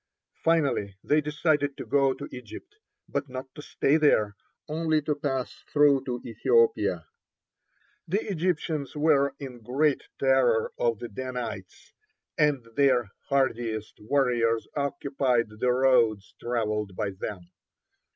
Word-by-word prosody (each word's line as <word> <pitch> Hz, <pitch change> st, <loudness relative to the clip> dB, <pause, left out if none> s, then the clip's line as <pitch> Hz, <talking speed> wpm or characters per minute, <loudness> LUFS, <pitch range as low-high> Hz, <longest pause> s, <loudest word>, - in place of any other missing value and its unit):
Finally 140 Hz, -, +1 dB
they 150 Hz, +1 st, +3 dB
decided 150 Hz, -1 st, 0 dB
to -, -, -6 dB
go 135 Hz, -1 st, +3 dB
to -, -, -6 dB
Egypt, 125 Hz, -, -10 dB, 0.3 s
but 140 Hz, -1 st, -3 dB
not 130 Hz, +1 st, -7 dB
to 150 Hz, -, -9 dB
stay 145 Hz, 0 st, +1 dB
there, 110 Hz, -10 st, +3 dB, 0.3 s
only 155 Hz, 0 st, +1 dB
to 150 Hz, 0 st, -1 dB
pass 135 Hz, -3 st, -2 dB, 0.2 s
through 145 Hz, -2 st, +4 dB
to 125 Hz, -2 st, -3 dB
Ethiopia. 445 Hz, -, +2 dB, 1.0 s
The 200 Hz, +7 st, -1 dB
Egyptians 160 Hz, -4 st, -1 dB
were 145 Hz, -2 st, +3 dB
in 130 Hz, -4 st, -8 dB
great 140 Hz, +5 st, +1 dB, 0.2 s
terror 130 Hz, -4 st, +3 dB
of 115 Hz, -2 st, +1 dB
the 120 Hz, -, -6 dB
Danites, 115 Hz, -4 st, -6 dB, 0.4 s
and 150 Hz, -4 st, +2 dB
their 125 Hz, -7 st, +3 dB, 0.2 s
hardiest 115 Hz, -5 st, -1 dB
warriors 115 Hz, -2 st, +1 dB
occupied 135 Hz, -4 st, 0 dB
the 125 Hz, -, +2 dB
roads 125 Hz, -5 st, +3 dB
travelled 105 Hz, -4 st, -2 dB
by 105 Hz, -1 st, -2 dB
them. 95 Hz, -2 st, -7 dB
135 Hz, 120 wpm, -27 LUFS, 115-150 Hz, 1.0 s, through